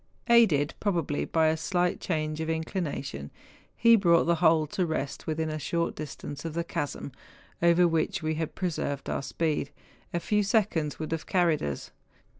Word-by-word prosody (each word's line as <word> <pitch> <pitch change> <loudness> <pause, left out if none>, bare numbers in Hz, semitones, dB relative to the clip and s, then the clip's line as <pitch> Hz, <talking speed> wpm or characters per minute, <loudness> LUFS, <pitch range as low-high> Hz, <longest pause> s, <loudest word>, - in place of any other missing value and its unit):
Aided 185 -12 +5
probably 170 -8 0
by 160 -1 +2
a 160 - +1
slight 175 +2 0
change 155 -2 -2
of 160 - -3
inclination, 160 - -3 0.5
he 230 0 +7
brought 170 -5 +4
the 170 0 +2
whole 160 -2 +5
to 180 +5 -2
rest 155 -5 -3
within 160 0 -1
a 155 - -3
short 170 +3 -1
distance 145 -1 -7
of 165 -1 -5
the 170 - 0
chasm, 145 -3 -4 0.5
over 170 +1 +5
which, 165 -1 0
had - - -6
we 155 - +1
pre¬ 165 +3 -2
served 140 -2 -3
our - - -1
speed, 150 0 -1 0.4
a 170 - -1
few 210 +4 +1
seconds 195 - +1
would 155 0 -5
have 165 -1 -3
carried 170 -5 +2
us. 70 -2 -4
160 Hz, 175 wpm, -28 LUFS, 155-175 Hz, 0.5 s, he